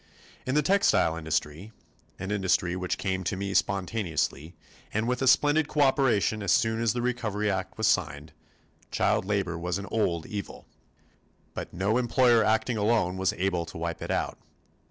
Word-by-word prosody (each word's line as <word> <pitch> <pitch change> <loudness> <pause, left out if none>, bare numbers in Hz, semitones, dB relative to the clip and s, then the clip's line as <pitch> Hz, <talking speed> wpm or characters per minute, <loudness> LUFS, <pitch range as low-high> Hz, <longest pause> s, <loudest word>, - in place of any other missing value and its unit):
In 130 - 0
the 150 - +3
textile 190 - +3
industry 80 +5 -3 0.4
an 95 +2 -5
industry 95 -3 +1
which 90 0 -2
came 95 -1 -2
to 90 - -2
me 100 0 -3
spontaneously 90 -6 -1 0.4
and 110 +2 -1
with 125 +1 -1
a 135 - +1
splendid 145 +3 +4
cooperation 130 -8 +2
as 100 -3 0
soon 110 0 +2
as 115 -2 +2
the 120 -1 -2
recovery 105 -4 -1
act 95 -1 -4
was - - 0
signed 75 +1 0 0.6
child - - +1
labor 95 -4 -1
was 90 +1 -2
an 100 - -6
old 85 -7 0
evil. 100 -2 -7 0.9
But - - -6
no 100 +7 0
employer 120 -2 +4
acting 110 +2 +1
alone 105 -4 +1
was 95 -1 +1
able 90 -1 -1
to - - -9
wipe 85 0 -4
it - - -6
out. - - -2
100 Hz, 165 wpm, -27 LUFS, 90-115 Hz, 0.9 s, splendid